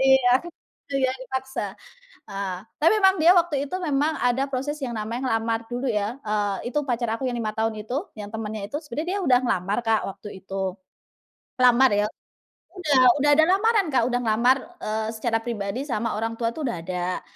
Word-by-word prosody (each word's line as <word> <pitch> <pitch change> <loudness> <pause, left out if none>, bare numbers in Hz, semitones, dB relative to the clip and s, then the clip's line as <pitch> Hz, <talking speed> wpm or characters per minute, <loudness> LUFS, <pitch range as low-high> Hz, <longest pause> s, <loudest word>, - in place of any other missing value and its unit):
Iya, 265 -1 +5 0.6
itu - - -5
ya 255 - 0
dipaksa. 265 +1 -4 0.7
Ah, 195 -2 -4 0.2
tapi 325 +6 +5
memang 385 0 +6
dia 335 +3 +7
waktu 310 -5 +2
itu, - - -6
memang 300 0 +1
ada 245 +2 +2
proses 280 +3 -3
yang 240 -2 -4
namanya 225 +3 -3
ngelamar 225 0 0
dulu 245 +2 -3
ya, 215 +4 -2
eee, 210 +1 -1
itu 295 - +1
pacar 240 -1 0
aku 265 - -5
yang 245 - -2
5 220 -2 -1
tahun 225 0 0
itu, 220 +4 -6 0.2
yang 205 -1 -7
temennya 215 -2 -5
itu, - - -3
sebenarnya 295 +4 -4
dia - - -2
udah 250 -2 +6
ngelamar, 195 -2 0
Kak, 225 -1 +3
waktu 200 +2 -8
itu. 190 -1 -3 0.9
Lamar 250 +1 +6
ya 205 0 +2 0.7
udah 300 -8 +2 0.2
udah 295 - +4
ada 315 +1 +6
lamaran, 405 +2 +3
Kak. 255 - +4
Udah 245 0 0
ngelamar, 235 +4 +3 0.3
eee, 215 0 -2
secara 225 0 0
pribadi 225 0 -3
sama 230 -4 -1
orang 225 +1 -2
tua 230 -1 0
tuh, 310 -4 -3
udah 235 - -2
ada. 180 0 -3
240 Hz, 185 wpm, -24 LUFS, 215-270 Hz, 0.9 s, dia